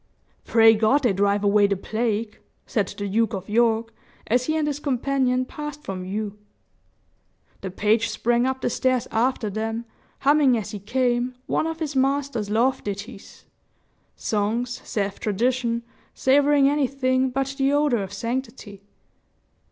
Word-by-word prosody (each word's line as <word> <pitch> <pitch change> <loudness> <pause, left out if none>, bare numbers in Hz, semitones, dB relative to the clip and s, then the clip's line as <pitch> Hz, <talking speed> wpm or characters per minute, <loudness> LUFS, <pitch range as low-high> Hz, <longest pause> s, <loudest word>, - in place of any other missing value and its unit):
"Pray 225 -1 +6
God 225 +7 +2
they 235 -5 +3
drive 200 +1 +1
away 205 0 +4
the 200 -1 -1
plague!" 220 +1 -2 0.3
said 205 -4 0
the 205 +1 -5
Duke 225 +3 +1
of 190 0 -7
York, 225 +1 +1 0.3
as 245 +3 +1
he 310 0 +1
and 310 - 0
his 295 -1 -2
companion 260 -2 0
passed 295 +2 -7
from 190 -1 -5
view. 205 +2 -4 1.2
The 190 - -4
page 215 +4 +1
sprang 240 +1 +1
up 265 0 -2
the - - 0
stairs 255 -2 0
after 235 0 0
them, 225 +3 -3 0.4
humming 280 -3 +4
as 215 -1 -5
he 210 - -6
came, 245 +3 0
one 315 - 0
of 325 0 -4
his 305 -3 -3
master's 270 -5 0
love 235 +5 +1
ditties 200 +2 -8 0.7
songs, 230 +4 -2
saith 200 -2 -3
tradition, 235 +2 0 0.3
savoring 285 +1 +4
anything 265 -2 +1
but 270 +1 -2
the 270 +1 +3
odor 290 -6 +2
of 195 -1 -6
sanctity. 230 -2 -5
235 Hz, 145 wpm, -24 LUFS, 210-265 Hz, 1.2 s, Pray